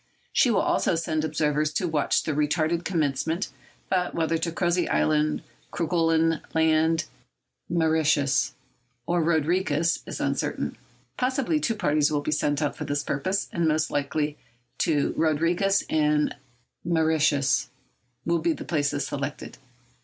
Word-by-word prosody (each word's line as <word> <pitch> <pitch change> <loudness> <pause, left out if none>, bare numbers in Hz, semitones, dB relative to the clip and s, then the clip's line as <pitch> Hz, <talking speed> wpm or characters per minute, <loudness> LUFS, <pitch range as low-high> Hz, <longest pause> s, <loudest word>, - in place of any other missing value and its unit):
She 250 - +4
will 225 - +3
also - - +1
send 160 -1 -1
observers 150 -1 0
to 180 - 0
watch 155 -3 +1
the - - -2
retarded 155 +3 0
commencement, 160 0 -1 0.4
but 180 -2 0
whether 165 0 +1
to 165 +1 -2
Crozet 175 +1 0
Island, 75 0 +1 0.3
Kerguelen 165 -1 +1
Land, 160 0 +3 0.6
Mauritius, 155 -5 +2 0.5
or 175 +3 +1
Rodriguez 165 0 +1
is - - -5
uncertain. - - -2 0.4
Possibly 265 +4 0
two 230 -6 0
parties 150 -5 +2
will 145 -1 0
be 155 - -2
sent 145 0 0
out 145 - -1
for - - -5
this 145 0 -1
purpose, 185 +9 -1
and 170 -2 +1
most 155 0 +1
likely 145 +1 -1 0.5
Rodriguez 165 +5 +1
and 150 -1 +1 0.5
Mauritius 155 -4 +2 0.6
will 170 0 +1
be 165 +1 +1
the - - -8
places 145 -2 0
selected. 140 0 -5
160 Hz, 130 wpm, -26 LUFS, 150-170 Hz, 0.6 s, She